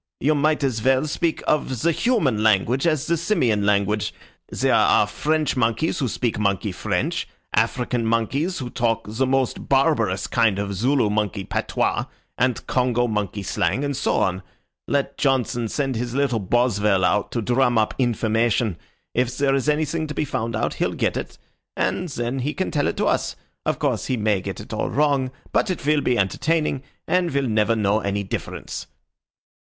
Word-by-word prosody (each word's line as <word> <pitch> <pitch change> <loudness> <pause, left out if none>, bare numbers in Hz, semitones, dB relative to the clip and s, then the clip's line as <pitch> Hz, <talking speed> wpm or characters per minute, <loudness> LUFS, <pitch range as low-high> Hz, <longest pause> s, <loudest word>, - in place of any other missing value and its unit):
You 150 +4 +2
might 150 0 +1
as 125 -5 0
well 130 +4 +3
speak 160 +2 -1
of 130 -5 0
the 170 - +4
human 155 - +1
language 110 - +2
as 155 -4 +1
the 170 - +1
Simian 125 - +1
language. 105 +1 +1 0.3
There - - +1
are - - +5
French 155 -1 0
monkeys 125 +6 0
who 135 - 0
speak 115 -2 -2
monkey 100 -3 0
French, - - -2 0.3
African 120 -2 0
monkeys 135 - 0
who 125 -3 -5
talk 115 -2 0
the 115 +5 0
most 130 -1 0
barbarous 135 - +2
kind 115 -4 +2
of 100 0 -2
Zulu 120 +2 +2
monkey 105 -2 -1
patois, - - -1 0.3
and 125 -1 0
Congo 125 -1 +1
monkey 105 -2 -2
slang, 100 +6 0
and 140 -1 -1
so 140 - 0
on. 95 -1 +1 0.5
Let 140 -1 -1
Johnson 125 -4 +1
send 135 +2 -2
his 120 +1 -3
little 135 -5 +1
Boswell 105 -3 +2
out 105 +3 +1
to 115 - 0
drum 125 0 +2
up 110 -1 +2
information. 115 -4 +1 0.3
If 125 0 0
there 140 -1 +2
is 135 +2 +1
anything 155 +1 0
to 150 - -6
be - - 0
found 115 -4 -3
out 110 - -1
he'll - - -1
get - - 0
it, - - -5 0.4
and 180 -1 -1
then 120 0 -3
he 145 +4 -2
can 190 - -2
tell 145 -2 +1
it - - -2
to - - +1
us. - - 0 0.3
Of - - +1
course - - -1
he 130 - 0
may 105 -3 +1
get - - -5
it - - -9
all - - -1
wrong, 140 -3 +2 0.2
but - - +1
it 180 -6 -3
will 150 0 +3
be 125 -3 +1
entertaining, 150 - 0 0.3
and 180 +1 +2
we'll 140 -2 0
never 110 0 +2
know 105 -1 +2
any 100 -1 -2
difference." 95 - -5
125 Hz, 180 wpm, -23 LUFS, 110-140 Hz, 0.5 s, are